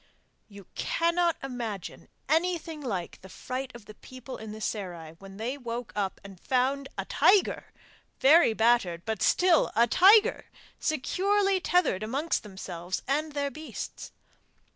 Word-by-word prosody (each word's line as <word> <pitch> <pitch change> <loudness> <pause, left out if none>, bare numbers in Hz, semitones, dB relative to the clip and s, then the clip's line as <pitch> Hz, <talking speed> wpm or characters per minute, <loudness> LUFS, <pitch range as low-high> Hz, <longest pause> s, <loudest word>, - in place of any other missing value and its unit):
You 200 -2 -13
cannot 340 0 +1
imagine 235 -8 -6 0.2
anything 325 0 0
like 195 -10 -4
the 190 - -13
fright 255 +6 -5
of 235 -3 -12
the 215 - -11
people 255 +3 -10
in 220 -1 -8
the 215 - -8
serai, 180 -7 -5
when 195 0 -12
they 245 +6 -4
woke 240 -1 -6
up 200 -2 -2
and 195 -2 -12
found 270 +4 0
a - - -3
tiger 395 -1 +2 0.5
very 290 -3 +6
battered 220 -7 +2
but 220 0 -3
still 360 -2 +3
a 230 +2 +5
tiger 400 - +5 0.3
securely 390 +6 +1
tethered 355 - +1
amongst 275 +9 -1
themselves 185 -3 -6
and 300 +3 -1
their 285 -1 -2
beasts! 310 +1 -8
250 Hz, 140 wpm, -28 LUFS, 205-315 Hz, 0.5 s, very